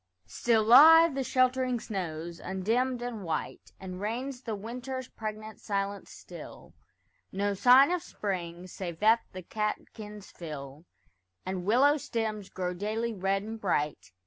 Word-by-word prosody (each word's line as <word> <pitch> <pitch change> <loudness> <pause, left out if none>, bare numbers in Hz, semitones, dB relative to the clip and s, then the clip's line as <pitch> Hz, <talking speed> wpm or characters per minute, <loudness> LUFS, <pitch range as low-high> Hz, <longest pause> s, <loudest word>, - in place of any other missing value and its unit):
Still 220 - +1
lie 320 +9 +9
the 270 0 -1
sheltering 255 -1 +1
snows, 170 -5 -5
undimmed 235 +7 -1
and 235 -4 -5
white; 160 -3 -4
And 185 0 -7
reigns 245 +5 -3
the 225 -4 -4
winter's 250 +4 -6
pregnant 215 -1 -7
silence 200 -1 -3
still; - - -11 0.6
No 200 +1 0
sign 255 - +6
of 360 -1 0
spring, 180 - -5
save 175 -2 -6
that 220 +2 +5
the 185 0 -8
catkins 210 +1 -5
fill, 150 -2 -8 0.6
And 185 -1 -4
willow 270 +8 +4
stems 220 -6 -3
grow 180 -1 -3
daily 220 +5 -2
red 195 0 -1
and 220 +1 -7
bright. 150 - -1
210 Hz, 135 wpm, -29 LUFS, 185-245 Hz, 0.6 s, lie